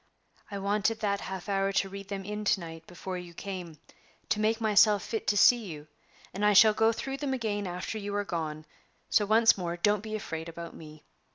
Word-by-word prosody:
I 200 - -5
wanted 205 +3 0
that 200 -1 0
half 190 0 -6
hour 195 -1 +1
to 195 - +1
read 195 0 -8
them 195 -1 -5
in 210 +1 -4
to 200 - +3
night 165 -1 -9
before 180 +1 -6
you 175 -1 -11
came, 180 -5 -6 0.5
to 210 - +1
make 220 +1 +1
myself 210 -2 +4
fit 225 - -4
to 205 - +2
see 240 +3 +6
you, 150 -5 -8 0.5
and 195 +3 -4
I 210 0 +5
shall 215 +1 +7
go 225 +1 +3
through 270 +4 -4
them 275 -2 -2
again 205 -5 -2
after 180 +5 -4
you 205 0 -4
are 205 0 -1
gone; 155 -4 -4 0.5
so, 205 - +3
once 225 0 +5
more, 175 -1 -3
don't 205 +3 +2
be 215 0 -5
afraid 165 -5 -5
about 170 0 -8
me. 155 -1 -12
200 Hz, 210 wpm, -29 LUFS, 175-215 Hz, 0.5 s, shall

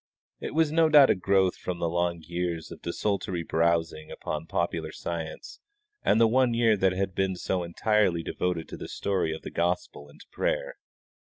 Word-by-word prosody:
It - - -6
was 160 -2 +3
no 160 0 +4
doubt 145 -3 +8
a - - +3
growth 95 0 +2
from 90 -1 -4
the 85 - -1
long 85 0 -1
years 85 -1 -3
of - - -10
desultory 90 -1 -2
browsing 80 -1 0
upon 75 +1 -5
popular 85 -2 -2
science 80 -2 -6 0.4
and 110 - +3
the 115 - +6
one 125 0 +3
year 115 -2 +4
that 95 -2 +2
had 95 0 -2
been 95 0 0
so 90 +1 -2
entirely 90 0 +1
devoted 90 -2 -2
to - - -7
the - - -7
story 95 -5 -1
of 80 - -6
the - - -7
gospel 85 -4 -2
and 75 - -18
to - - -15
prayer. - - -2
90 Hz, 185 wpm, -27 LUFS, 85-105 Hz, 0.4 s, doubt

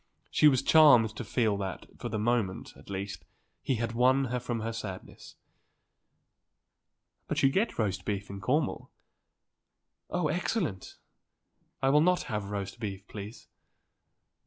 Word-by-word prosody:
He 150 - +5
was 130 -4 +4
charmed 125 -9 +6
to - - -5
feel 110 -1 +1
that, 95 -5 -5
for 120 - -4
the 110 - -2
moment, 110 -3 -1
at - - -16
least, 100 0 -5 0.4
he 135 - 0
had 115 0 -2
won 130 +3 +3
her 125 - 0
from 120 -2 -3
her 115 +1 -3
sadness. 100 -5 -8 1.9
"But - - -1
you 135 - +5
get 205 +9 0
roast 100 -4 -1
beef 100 0 -3
in 100 0 -8
Cornwall." 145 +9 0 1.2
"Oh, 180 -3 0
excellent. 160 - -2 0.9
I 135 - +4
will 150 +2 +5
not 180 +2 +3
have 105 -3 -3
roast 100 +1 -5
beef, 100 -3 -5
please." 105 +2 -9
115 Hz, 140 wpm, -29 LUFS, 100-135 Hz, 1.9 s, charmed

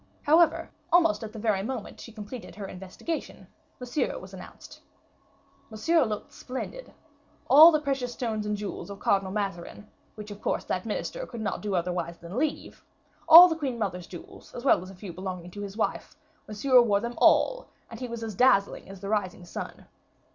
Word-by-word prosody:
However, 320 +2 +3 0.2
almost 335 -6 +3
at 215 - -6
the 225 - -10
very 210 -3 0
moment 230 0 -6
she 230 - -10
completed 215 +2 -9
her 205 -1 -7
investigation, 190 - -6 0.3
Monsieur 250 +3 -2
was - - -11
announced. - - -12 0.9
Monsieur 305 +9 +2
looked 215 -2 -5
splendid. 265 - -7 0.6
All 315 +4 +9
the 305 - +2
precious 270 -4 -2
stones 220 -4 -3
and 210 0 -1
jewels 205 0 -6
of 200 0 -8
Cardinal 195 -1 +1
Mazarin, 200 0 -5 0.3
which 210 -1 -9
of 205 - -10
course - - -1
that - - -3
minister - - -4
could 235 -3 -8
not 205 - -3
do 205 -2 -2
otherwise 175 -1 -2
than 170 +3 -10
leave; 305 0 -3 0.5
all 335 +3 +12
the 330 - -1
queen 275 -6 -3
mother's 180 -5 -4
jewels 175 - -12
as 245 - -7
well 265 - +4
as 185 - -10
a 195 - -12
few 180 -1 -9
belonging 180 -1 -6
to 205 - -8
his 200 +1 -7
wife 225 - -2 0.3
Monsieur 245 +4 +4
wore 205 -4 +2
them 235 +3 -4
all, - - +3 0.2
and - - -10
he 255 - -4
was 235 -1 -6
as 220 -1 -5
dazzling 200 -4 +2
as 195 -1 -11
the 200 - -5
rising 190 -4 -2
sun. - - -8
215 Hz, 185 wpm, -27 LUFS, 195-260 Hz, 0.9 s, all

